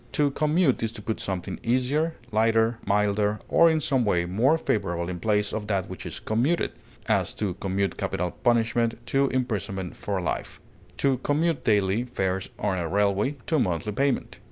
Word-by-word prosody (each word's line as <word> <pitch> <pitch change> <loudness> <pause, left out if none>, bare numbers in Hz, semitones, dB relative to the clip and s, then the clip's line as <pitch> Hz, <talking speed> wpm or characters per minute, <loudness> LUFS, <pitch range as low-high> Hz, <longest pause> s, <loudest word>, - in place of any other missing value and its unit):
To 145 -1 +2
commute 150 0 +2
is 115 -1 -1
to 110 - -8
put 110 +1 -2
something 95 0 -4
easier, 135 +7 +1 0.2
lighter, 115 +1 +2
milder, 105 +1 +2
or 170 - +5
in 160 -1 +2
some 135 -4 +1
way 90 -5 +1
more 115 - +3
favorable 85 - -1
in 90 -1 -4
place 105 +1 +1
of 105 -1 -3
that 95 -3 -1
which 95 - -7
is - - -6
commuted; 130 +11 0 0.3
as, - - +1
to 100 -4 -2
commute 95 +1 -2
capital 90 0 -2
punishment 115 0 +1
to 135 0 +2
imprisonment 100 -7 -2
for 100 -2 -3
life; 90 - -3 0.4
to 135 -3 +2
commute 155 +3 0
daily 105 0 +2
fares 95 -6 -2
on 95 -3 -1
a 85 - -2
railway 100 - +1
to 160 - +1
a - - +3
monthly 90 -1 0
payment. 135 +6 -1
110 Hz, 175 wpm, -26 LUFS, 95-130 Hz, 0.4 s, or